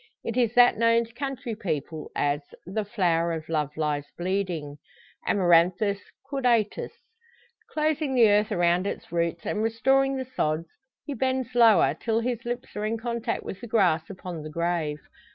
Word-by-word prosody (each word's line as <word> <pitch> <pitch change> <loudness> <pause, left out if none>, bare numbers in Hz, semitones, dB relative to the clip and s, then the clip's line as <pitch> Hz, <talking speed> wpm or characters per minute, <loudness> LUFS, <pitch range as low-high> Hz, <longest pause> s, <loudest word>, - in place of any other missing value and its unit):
It 230 - -3
is 240 -2 +1
that 245 -3 +6
known 230 0 +4
to 230 - -19
country 270 -2 -4
people 160 -5 -4
as 145 +1 +1 0.2
"The 205 +4 -2
Flower 170 -5 +1
of 160 -1 -5
Love 150 -2 -2
lies 150 -2 -1
bleeding" 175 -6 -2 0.5
(Amaranthus 185 +2 +3 0.3
caudatus). 245 -6 +1 0.8
Closing 305 -3 0
the 235 -3 +7
earth 210 +1 +3
around 175 0 +2
its - - -6
roots, 170 -1 -1
and 215 - -1
restoring 270 +4 +2
the 260 - -3
sods, 160 -9 -2 0.4
he 290 - -4
bends 260 -2 -1
lower, 220 - +5
till 225 +7 -1
his 240 -1 -3
lips 240 +1 -5
are 210 - -3
in 220 +2 -1
contact 235 0 -3
with 195 - -7
the 240 - -7
grass 180 -8 +2
upon 180 -4 -7
the 155 - -7
grave. 165 -2 -1
205 Hz, 160 wpm, -26 LUFS, 170-240 Hz, 0.8 s, the